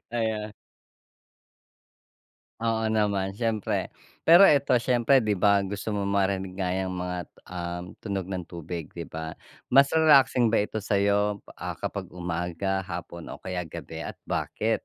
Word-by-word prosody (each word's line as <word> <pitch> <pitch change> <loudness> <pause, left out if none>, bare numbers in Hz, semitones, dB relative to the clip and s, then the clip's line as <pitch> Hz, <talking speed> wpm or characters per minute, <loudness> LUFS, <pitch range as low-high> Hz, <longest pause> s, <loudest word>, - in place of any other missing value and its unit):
Ayan. 110 -2 -2 2.1
Oo 115 -1 +1
naman, 100 -2 0
siyempre. 115 -3 -1 0.3
Pero 170 +4 +9
ito 140 -2 +3
siyempre 125 +2 +4
di 105 -3 0
ba, 100 +1 +4
gusto 100 +2 -4
mong 100 -1 -1
marinig 95 -1 0
nga 90 -1 0
yang 95 0 -1
mga, 90 0 -3 0.3
um, 90 -1 -5 0.2
tunog 100 -4 -3
ng 95 -1 -4
tubig, 85 -1 -6
di 85 - -4
ba? 80 0 -6 0.3
Mas 140 +2 +5
relaxing 140 -6 +5
ba 105 -2 +2
ito 110 0 -5
sa'yo, 100 0 +2 0.2
ah, - - -6
kapag - - -4
umaga, 90 +2 -2
hapon 85 -2 -7
o - - -7
kaya 90 -1 -4
gabi 80 - -7
at - - -6
bakit? 110 +1 -1
100 Hz, 140 wpm, -27 LUFS, 90-110 Hz, 2.1 s, Pero